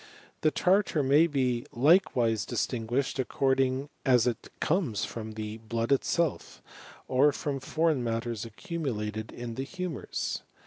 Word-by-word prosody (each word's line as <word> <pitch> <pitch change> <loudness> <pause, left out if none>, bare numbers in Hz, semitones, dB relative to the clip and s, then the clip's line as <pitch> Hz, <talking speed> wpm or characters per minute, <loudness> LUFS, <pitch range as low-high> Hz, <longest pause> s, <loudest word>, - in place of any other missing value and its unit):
The 155 - +4
tartar 180 -2 +2
may 135 -4 +3
likewise 120 - +3
distinguished 120 +3 -1
according 135 +1 +1
as 125 -4 +4
it 120 -2 -2
comes 150 - 0
from 110 -1 -7 0.3
blood 115 +2 -1
itself, 160 +3 0 0.5
or 135 +3 +4
from 140 0 -3
foreign 155 0 +1
matters 115 -1 -2
accumulated 110 - -4 0.3
the 135 - -3
humours. 180 +1 -4
130 Hz, 105 wpm, -29 LUFS, 115-150 Hz, 0.5 s, The